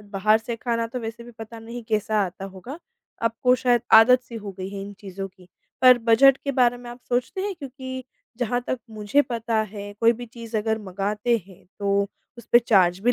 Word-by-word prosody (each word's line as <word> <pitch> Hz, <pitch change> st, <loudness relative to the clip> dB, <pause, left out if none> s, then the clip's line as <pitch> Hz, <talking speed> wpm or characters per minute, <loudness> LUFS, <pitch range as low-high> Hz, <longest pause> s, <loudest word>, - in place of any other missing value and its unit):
अ, -, -, -16 dB
बाहर 205 Hz, +2 st, +2 dB
से 230 Hz, +1 st, -5 dB
खाना 230 Hz, 0 st, -1 dB
तो 245 Hz, +2 st, -6 dB
वैसे 230 Hz, +1 st, -7 dB
भी 240 Hz, -, -11 dB
पता 225 Hz, 0 st, -10 dB
नहीं 235 Hz, +2 st, -8 dB
कैसा 215 Hz, -1 st, +1 dB
आता 185 Hz, +2 st, -9 dB
होगा? 195 Hz, -, -9 dB, 0.4 s
आपको 230 Hz, +2 st, +2 dB
शायद 240 Hz, -1 st, +2 dB
आदत-सी 240 Hz, +1 st, +6 dB
हो 205 Hz, -3 st, -7 dB
गई 185 Hz, 0 st, -4 dB
है 200 Hz, 0 st, -6 dB
इन 200 Hz, +1 st, -8 dB
चीज़ों 195 Hz, -1 st, -6 dB
की। 185 Hz, -1 st, -21 dB, 0.3 s
पर 255 Hz, -1 st, +8 dB
बजट 240 Hz, +4 st, +5 dB
के 280 Hz, -, -1 dB
बारे 245 Hz, -2 st, +3 dB
में 245 Hz, 0 st, -10 dB
आप 240 Hz, +1 st, -11 dB
सोचते 250 Hz, +9 st, -1 dB
हैं, 400 Hz, 0 st, -2 dB
क्योंकि 260 Hz, -4 st, -7 dB, 0.3 s
जहाँ 245 Hz, 0 st, 0 dB
तक 255 Hz, -, -1 dB
मुझे 215 Hz, +6 st, +1 dB
पता 230 Hz, -3 st, -1 dB
है 205 Hz, -1 st, -7 dB
कोई 230 Hz, 0 st, +5 dB
भी 240 Hz, +1 st, -8 dB
चीज़ 230 Hz, -1 st, -7 dB
अगर 220 Hz, +1 st, -1 dB
मँगाते 210 Hz, +4 st, -1 dB
हैं, 190 Hz, -2 st, -17 dB
तो 200 Hz, 0 st, +1 dB, 0.3 s
उस 235 Hz, -, -12 dB
पे 240 Hz, -, +9 dB
चार्ज 190 Hz, -7 st, +3 dB
भी 245 Hz, +4 st, +3 dB
230 Hz, 210 wpm, -24 LUFS, 205-245 Hz, 0.4 s, पे